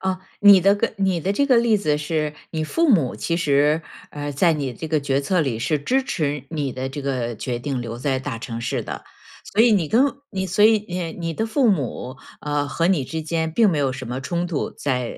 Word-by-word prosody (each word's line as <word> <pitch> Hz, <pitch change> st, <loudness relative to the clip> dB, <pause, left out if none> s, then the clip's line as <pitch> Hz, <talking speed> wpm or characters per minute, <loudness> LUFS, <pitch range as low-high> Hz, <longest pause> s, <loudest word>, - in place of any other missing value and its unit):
啊， 190 Hz, -1 st, -2 dB, 0.2 s
你 200 Hz, -2 st, +8 dB
的 195 Hz, +2 st, +4 dB
个 205 Hz, +3 st, -1 dB
你 190 Hz, -3 st, +1 dB
的 190 Hz, +5 st, 0 dB
这 280 Hz, +7 st, +1 dB
个 255 Hz, -3 st, +4 dB
例 230 Hz, -2 st, +4 dB
子 150 Hz, -7 st, 0 dB
是， 150 Hz, 0 st, -2 dB, 0.2 s
你 160 Hz, -1 st, -2 dB
父 330 Hz, -, +1 dB
母 155 Hz, -, +2 dB
其 170 Hz, -, -1 dB
实， 150 Hz, -1 st, +2 dB, 0.3 s
呃， 145 Hz, 0 st, -5 dB
在 165 Hz, +5 st, +3 dB
你 140 Hz, -4 st, -2 dB
这 160 Hz, +7 st, -6 dB
个 155 Hz, -1 st, +1 dB
决 140 Hz, -1 st, 0 dB
策 165 Hz, +5 st, +1 dB
里， 130 Hz, -7 st, -1 dB
是 150 Hz, +6 st, 0 dB
支 260 Hz, -, +1 dB
持 150 Hz, -, -2 dB
你 145 Hz, -5 st, -2 dB
的 130 Hz, +1 st, -4 dB
这 135 Hz, +2 st, -6 dB
个 125 Hz, -4 st, -2 dB
决 120 Hz, +3 st, -4 dB
定 130 Hz, 0 st, -3 dB
留 115 Hz, -1 st, -5 dB
在 130 Hz, 0 st, 0 dB
大 130 Hz, -3 st, -5 dB
城 115 Hz, 0 st, -6 dB
市 115 Hz, -, -2 dB
的。 -, -, -7 dB, 0.5 s
所 220 Hz, -, +5 dB
以 240 Hz, -, +5 dB
你 190 Hz, -6 st, +2 dB
跟 240 Hz, -, +4 dB, 0.3 s
你 190 Hz, -1 st, -2 dB
所 190 Hz, +4 st, +3 dB
以 215 Hz, -1 st, +4 dB
你 180 Hz, 0 st, -3 dB
呃 165 Hz, -2 st, -4 dB
你 165 Hz, -2 st, -4 dB
的 220 Hz, +8 st, -2 dB
父 245 Hz, 0 st, +3 dB
母， 135 Hz, -, -3 dB, 0.2 s
呃， 145 Hz, -1 st, -1 dB
和 165 Hz, +3 st, 0 dB
你 175 Hz, -8 st, +2 dB
之 160 Hz, +4 st, -4 dB
间 160 Hz, 0 st, -1 dB
并 215 Hz, +4 st, +4 dB
没 160 Hz, -, 0 dB
有 140 Hz, -2 st, +1 dB
什 130 Hz, -1 st, -7 dB
么 125 Hz, +2 st, -4 dB
冲 175 Hz, +5 st, -2 dB
突， 165 Hz, -4 st, -2 dB
在 125 Hz, -3 st, -2 dB
155 Hz, 255 characters per minute, -22 LUFS, 135-190 Hz, 0.5 s, 你